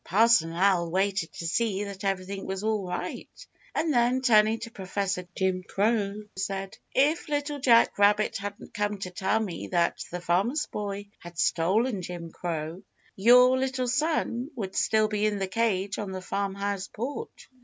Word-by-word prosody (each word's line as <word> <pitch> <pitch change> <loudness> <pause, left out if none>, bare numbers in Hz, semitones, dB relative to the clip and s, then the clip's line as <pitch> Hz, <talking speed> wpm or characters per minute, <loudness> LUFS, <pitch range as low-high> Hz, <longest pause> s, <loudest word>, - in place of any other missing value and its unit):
Parson 205 -4 +4
Owl 175 -1 +2
waited 190 -1 0
to 170 - -7
see 200 +2 0
that 200 -1 -7
everything 195 0 -2
was 190 +1 -4
all 215 -3 0
right, 180 0 -5 0.5
and 320 -1 +1
then, 245 +1 +2
turning 220 -2 +5
to 230 - -6
Professor 190 -3 -3
Jim 190 -1 +1
Crow, 205 +1 0
said: 195 0 -3 0.2
"If 300 +5 +2
Little 290 0 -1
Jack 235 -5 +4
Rabbit 205 +1 +3
hadn't 205 +1 -7
come 210 -1 -1
to 185 -2 -6
tell 190 +4 0
me 205 -6 -4
that 170 -2 +1
the 180 - -4
Farmer's 200 - +1
Boy 205 -1 -5
had 175 -1 -11
stolen 195 +8 +1
Jimmy 170 -1 -7
Crow, 165 +1 -4 0.3
your 250 +5 +6
little 260 -1 -1
son 260 -2 0
would 195 -6 -5
still 215 -1 +3
be 215 0 0
in 210 -1 -1
the 195 -1 -2
cage 200 -1 0
on 205 -2 -4
the 185 - -4
farmhouse 200 0 -2
porch." 285 - -6
200 Hz, 165 wpm, -27 LUFS, 185-230 Hz, 0.5 s, your